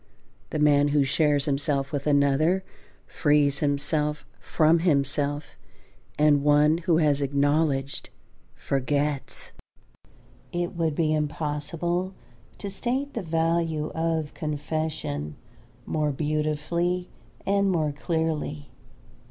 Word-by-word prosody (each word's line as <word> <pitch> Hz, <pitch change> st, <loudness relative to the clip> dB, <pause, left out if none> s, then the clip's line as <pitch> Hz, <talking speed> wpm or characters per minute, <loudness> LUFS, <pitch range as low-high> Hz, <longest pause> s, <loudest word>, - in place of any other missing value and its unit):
(The -, -, -3 dB
man 145 Hz, -1 st, +4 dB
who 145 Hz, -1 st, +3 dB
shares 145 Hz, +1 st, +2 dB
himself 140 Hz, -1 st, 0 dB
with 145 Hz, -1 st, -3 dB
another 145 Hz, +6 st, +3 dB, 0.4 s
frees 145 Hz, -2 st, +2 dB
himself 150 Hz, +1 st, 0 dB
from 160 Hz, +1 st, +3 dB
himself; 145 Hz, -2 st, +1 dB, 0.6 s
and 150 Hz, -1 st, +4 dB
one 150 Hz, +2 st, +4 dB
who 170 Hz, -2 st, +2 dB
has 145 Hz, -3 st, +2 dB
acknowledged, 140 Hz, 0 st, 0 dB, 0.5 s
forgets.) 140 Hz, +1 st, -2 dB, 1.0 s
It 175 Hz, 0 st, -2 dB
would 165 Hz, -3 st, 0 dB
be 155 Hz, -1 st, +1 dB
impossible 160 Hz, +4 st, -2 dB, 0.4 s
to 200 Hz, -, -6 dB
state 260 Hz, +8 st, -2 dB
the 230 Hz, -, -3 dB
value 165 Hz, -2 st, 0 dB
of 160 Hz, -2 st, -2 dB
confession 150 Hz, -, -3 dB, 0.5 s
more 150 Hz, -1 st, 0 dB
beautifully 155 Hz, +5 st, -1 dB, 0.4 s
and 200 Hz, 0 st, +2 dB
more 160 Hz, -5 st, +1 dB
clearly. 150 Hz, -2 st, -3 dB
150 Hz, 100 wpm, -26 LUFS, 145-165 Hz, 1.0 s, man